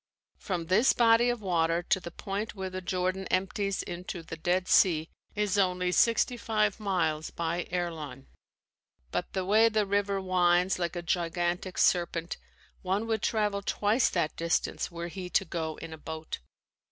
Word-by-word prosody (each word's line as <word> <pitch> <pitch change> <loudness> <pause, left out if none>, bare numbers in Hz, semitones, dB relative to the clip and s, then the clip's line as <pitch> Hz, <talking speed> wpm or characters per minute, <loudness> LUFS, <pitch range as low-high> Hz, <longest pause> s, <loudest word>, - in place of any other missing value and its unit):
From 175 -4 -3
this 200 +9 +4
body 235 0 +5
of 240 -2 -2
water 170 -2 +1
to 190 - +1
the 175 - -7
point 200 +5 -4
where 190 -1 -4
the 185 0 -5
Jordan 185 +1 -1
empties 195 +1 -1
into 175 0 -6
the 165 - -7
Dead 175 +2 0
Sea 160 -3 +4 0.2
is 210 -1 +1
only 180 -1 +1
sixty 230 +5 +3
five 215 -2 0
miles 165 -7 0
by 170 +1 -3
airline, 160 -7 -4 0.9
but - - -2
the 190 -1 -1
way 220 +4 +5
the 215 -2 +1
river 200 0 0
winds 180 -1 +2
like 175 0 -2
a 175 - -4
gigantic 175 +1 -1
serpent, 170 -1 +1 0.4
one 195 +4 -1
would 220 -2 -1
travel 210 -2 0
twice 210 +4 +2
that 170 -4 -1
distance 165 0 -1
were 170 -1 -5
he 180 +1 -6
to 195 - +2
go 160 -2 -3
in 165 -1 -8
a 160 - -10
boat. 160 0 -6
185 Hz, 165 wpm, -29 LUFS, 170-200 Hz, 0.9 s, body